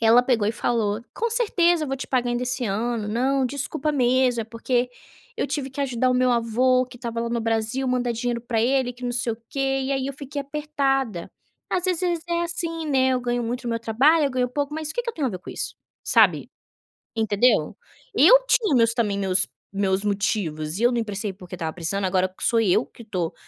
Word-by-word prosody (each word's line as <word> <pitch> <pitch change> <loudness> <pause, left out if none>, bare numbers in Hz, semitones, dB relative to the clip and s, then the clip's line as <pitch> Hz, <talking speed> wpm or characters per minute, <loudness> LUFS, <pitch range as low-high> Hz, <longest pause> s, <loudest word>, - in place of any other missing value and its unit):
ela 230 +2 +6
pegou 235 -5 +1
e - - 0
falou: 225 -2 -1
"Com 465 - -1
certeza 350 -8 +2
eu - - -6
vou 270 - -2
te - - -5
pagar 245 -2 0
ainda 240 +1 -1
esse 250 0 -2
ano, 220 +2 -1
não, 260 +5 +1
desculpa 285 +3 -2
mesmo 255 -2 +2
é - - -3
porque 240 +2 -1 0.5
eu - - 0
tive 285 -2 -3
que 270 +1 -14
ajudar 255 -2 0
o 255 - +2
meu 250 0 +3
avô 250 +2 +2
que 250 - -13
estava 235 -2 -4
lá 235 - -2
no 235 -1 -1
Brasil 225 +4 -1
mandar 250 -1 0
dinheiro 235 +1 -2
para 235 -1 -2
ele 255 0 +1
que 250 +1 -10
não 245 - -1
sei 240 -1 -1
o - - -7
que - - -6
e 270 0 0
aí 265 -1 -1
eu 275 - -4
fiquei 285 +1 -6
apertada, 275 - -1 0.4
às 365 0 -1
vezes 355 -2 0
é 340 0 0
assim, 330 -1 -3
né, 265 -3 +3
eu 255 -1 +1
ganho 240 0 -1
muito 245 +2 -3
o - - -2
meu 230 0 -1
trabalho 275 +8 +3
eu 275 - +1
ganho 250 -1 0
pouco", 285 +3 -2
mas 310 0 -4
o - - -6
que 485 - -1
que 470 - -3
eu - - -20
tenho 295 -4 -1
a 250 - -1
ver 185 - -5
com - - -10
isso. - - -4 0.3
Sabe? - - +3 0.7
Entendeu. 220 -5 +2 0.4
Eu - - +7
tinha 455 - +3
meus 230 -2 +4
também 210 -4 0
meus 190 -1 +2 0.3
meus 195 -1 +1
motivos 190 -5 -1
e - - -1
eu 245 - +5
não 240 - -1
emprestei 210 -2 -3
porque 180 -1 -10
estava 160 -2 -3
precisando 190 +3 -2
agora 185 0 +1
sou 230 -1 +3
eu 215 +3 +3
que 235 - -14
estou 180 -7 -3
245 Hz, 225 wpm, -24 LUFS, 225-275 Hz, 0.7 s, Eu